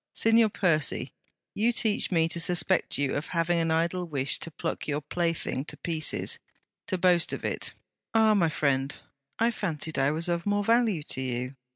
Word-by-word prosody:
'Signor 225 0 +4
Percy, 165 -8 0 0.4
you 225 +4 +2
teach 220 -3 +1
me 165 -3 +2
to 170 - -2
suspect 175 +1 +2
you 140 -1 0
of 145 - -2
having 170 0 +1
an 165 0 0
idle 170 +3 0
wish 145 -5 -1
to - - -6
pluck 165 +1 -4
your 145 -1 -1
plaything 165 -3 -2
to - - -7
pieces: 160 -3 -1 0.5
to 185 - -1
boast 175 -1 +3
of - - -5
it? - - -2 0.4
Ah! 220 -1 +5
my 175 -6 +3
friend, 140 -2 0 0.4
I 230 +1 +2
fancied 160 -8 -3
I 135 +1 +3
was 160 +3 -1
of 170 +1 -1
more 205 0 +1
value 225 -7 +2
to 130 - -4
you. 125 +1 -3
170 Hz, 180 wpm, -27 LUFS, 150-190 Hz, 0.5 s, Ah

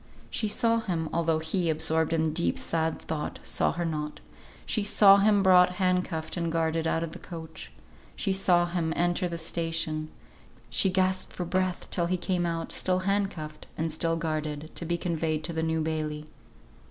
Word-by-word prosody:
She 215 - 0
saw 230 +2 +2
him 170 -7 -2
(although 165 -1 +2
he, 160 +2 -1
absorbed 160 0 +1
in 160 -1 +1
deep 170 +1 +1
sad 160 -1 -1
thought, 155 -2 -4
saw - - +1
her 175 +1 -2
not), 150 -2 -3 0.5
she 215 - -1
saw 200 -1 +7
him 200 0 +4
brought 180 -1 +6
hand 185 -1 +2
cuffed 160 -3 -4
and 170 -2 -1
guarded 165 0 0
out 165 0 +1
of 165 - -4
the - - -9
coach. 165 -2 -9 0.4
She 195 - 0
saw 180 -2 +3
him 170 -2 -1
enter 175 +1 +1
the 170 - -4
station, 165 -1 -1 0.6
she 195 - +4
gasped 185 0 0
for 180 - -4
breath 185 0 -1
till 170 -1 +1
he 185 +1 0
came 175 -1 -1
out, 165 -1 -3
still 185 0 +1
hand 200 0 +2
cuffed, 155 -3 -9
and 160 0 -1
still 165 +1 0
guarded, 155 -1 -3
to 170 - -4
be 170 +1 0
conveyed 160 -3 -1
to 170 - -3
the 160 - -1
New 160 0 0
Bailey. 155 -1 -2
165 Hz, 185 wpm, -28 LUFS, 160-185 Hz, 0.6 s, saw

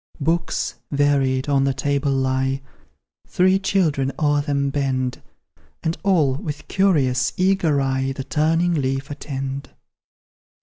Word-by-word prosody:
Books, 165 +2 -1
varied, 140 -2 +1
on 140 -1 +2
the 135 -1 +1
table 140 +1 0
lie, 135 0 0 0.6
Three 185 +1 +3
children 160 -9 +1
o'er 145 -1 +2
them 140 -1 -1
bend, 130 -3 -1 0.6
And 165 0 0
all, 165 -9 +3
with 150 0 -6
curious, 135 -10 +2
eager 185 -6 +2
eye, 135 0 0
The 135 0 -5
turning 165 +4 +1
leaf 135 -1 -1
attend. 135 -1 -5
140 Hz, 120 wpm, -22 LUFS, 135-160 Hz, 0.6 s, Three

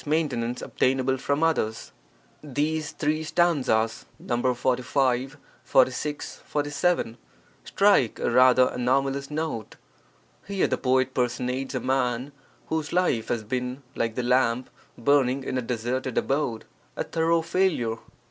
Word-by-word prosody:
maintenance 135 -6 -1
obtainable 130 0 +1
from 140 +4 -1
others. 135 -9 0 0.5
[These 150 +2 -1
three 155 +1 -1
stanzas 140 -10 +1
(Nos. 120 +1 -1
45, 130 +1 0 0.3
46, 130 +4 +1
47) 145 -3 -1 0.5
strike 200 - +3
a - - -1
rather 130 +1 +6
anomalous 135 +2 0
note. 150 -8 -4 0.7
Here 200 -1 +1
the - - -1
poet 130 0 +1
personates 125 +1 -1
a - - 0
man 130 0 -1 0.3
whose 160 -2 -2
life 175 -11 +1
has 115 -2 -1
been, 125 +3 -3
like 115 -1 -2
the 125 - -1
lamp 125 0 +1 0.3
burning 135 +1 +2
in 130 - -2
a - - -2
deserted 125 +2 -3
abode, 135 -5 -1 0.3
a - - -2
thorough 165 0 +1
failure. 165 -10 +1
130 Hz, 120 wpm, -26 LUFS, 125-150 Hz, 0.7 s, rather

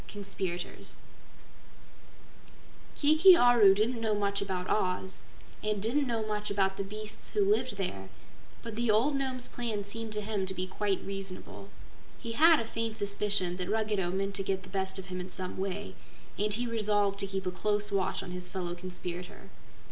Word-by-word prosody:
Conspirators 190 -3 -4 2.0
Kiki 315 +5 +7
Aru 235 -7 +7
didn't 225 +3 0
know 220 -2 +1
much 200 -1 0
about 185 -2 -2
Oz 185 -1 -1 0.4
and 210 -1 -1
didn't 255 +7 +1
know 225 -2 -1
much 210 -1 -2
about 195 -1 +1
the 195 - -1
beasts 210 +2 -7
who 205 -2 +2
lived 220 +1 +1
there, 100 - -4 0.5
but 230 -2 -6
the 235 +1 0
old 235 +8 +4
Nome's 260 -2 -1
plan 225 -4 -3
seemed 225 +2 -5
to 210 - +1
him 205 -2 -2
to 190 - -2
be 185 - -2
quite 195 +1 -1
reasonable. 195 -1 -7 0.5
He 230 - -6
had 320 +6 +6
a 230 - -2
faint 225 0 -3
suspicion 200 -3 0
that 180 0 -3
Ruggedo 210 -4 0
meant 195 +2 -1
to 195 0 -1
get 190 -1 -1
the 185 - -12
best 190 0 -2
of 190 - -6
him 185 -1 -5
in 180 - -7
some 185 0 -3
way, 195 0 -3 0.4
and 210 +1 0
he 235 +4 +1
resolved 205 -3 +1
to 195 - 0
keep 195 -1 -3
a 180 - 0
close 205 +2 0
watch 195 -2 0
on 180 - -7
his 180 0 -4
fellow 180 -2 -3
conspirator. 180 0 -7
200 Hz, 180 wpm, -30 LUFS, 190-220 Hz, 2.0 s, Kiki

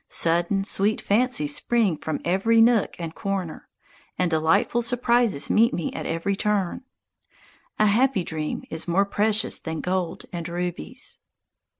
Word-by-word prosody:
Sudden, 175 +4 +2
sweet 205 +1 0
fancies 205 - +1
spring 230 -6 +1
forth - - -16
from 160 - -2
every 195 +6 +2
nook 225 -2 +4
and 165 -2 -5
corner, 190 -3 -4 0.5
and 180 -2 0
delightful 160 +9 +2
surprises 240 - +1
meet 230 +3 +4
me 170 - -3
at - - -5
every 165 +5 -1
turn. 205 -2 -1 1.0
A 215 - +4
happy 230 0 +2
dream 155 -2 -4
is 160 +2 -3
more 190 +4 +2
precious 210 +2 0
than 160 -1 -5
gold 180 0 -2
and 170 -1 -4
rubies. 175 - -5
195 Hz, 140 wpm, -24 LUFS, 170-220 Hz, 1.0 s, nook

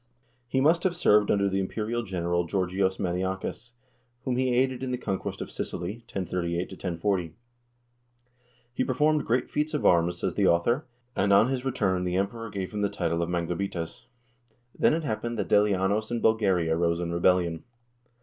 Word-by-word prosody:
He 130 +2 0
must 165 +4 +4
have 180 -1 0
served 105 -11 +4
under 100 -1 +3
the 95 0 0
imperial 110 +5 -2
general 85 -4 -1
Georgios 95 +1 0
Maniakes, 95 +6 -3 0.5
whom 130 -2 -1
he 130 0 +1
aided 130 +1 +1
in 130 - -3
the 125 - -1
conquest 95 -5 -4
of - - -6
Sicily, 90 +6 -4
1038 90 -1 -2
1040. 90 -2 -2 1.4
He - - 0
performed 150 +3 +1
great 125 +2 +1
feats 150 +1 -1
of 150 - -1
arms, 85 0 +4
says - - -2
the - - +2
author, 120 - +2 0.3
and 100 +1 +2
on 100 +5 +6
his 130 -2 -2
return 100 -9 0
the 90 0 -1
Emperor 115 +4 -2
gave 95 -3 -4
him 105 -1 -3
the 100 - +1
title 85 -2 -1
of 85 - -1
"manglabites." 85 +1 -3 0.7
Then - - +3
it 165 - -2
happened 120 -2 -3
that 100 -6 -2
Delianos 105 +1 +2
in 120 -1 -1
Bulgaria 95 -8 +2
rose 85 0 +1
in 85 -1 -3
rebellion. 85 -1 +2
100 Hz, 170 wpm, -27 LUFS, 90-120 Hz, 1.4 s, on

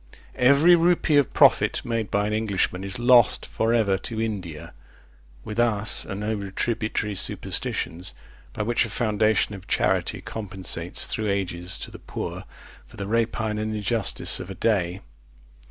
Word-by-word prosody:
Every 140 +7 +5
rupee 170 -3 +3
of 145 - +3
profit - - +4
made 115 -4 -2
by 100 +1 +1
an 105 - -2
Englishman 100 -4 -1
is 100 0 -5
lost 120 -2 +4
for 115 +1 -1
ever 105 -5 +2
to 110 +3 -5
India. 90 -8 -4 0.7
With 105 +2 -5
us 110 -2 0
are 95 - -4
no 105 +2 -2
retributory 105 +1 -2
superstitions, 90 -1 -2 0.4
by 105 - -3
which 120 +2 +1
a 115 - -4
foundation 110 -1 +1
of 95 -1 -10
charity - - 0
compensates, 95 -5 -2
through 110 -1 -2
ages, 90 -2 -2
to - - -7
the - - -11
poor, - - -6 0.4
for - - -16
the 100 - -4
rapine 110 0 -1
and 110 0 -2
injustice 105 0 +1
of 90 - -7
a 95 - -6
day. 95 -5 0
105 Hz, 155 wpm, -24 LUFS, 95-115 Hz, 0.7 s, Every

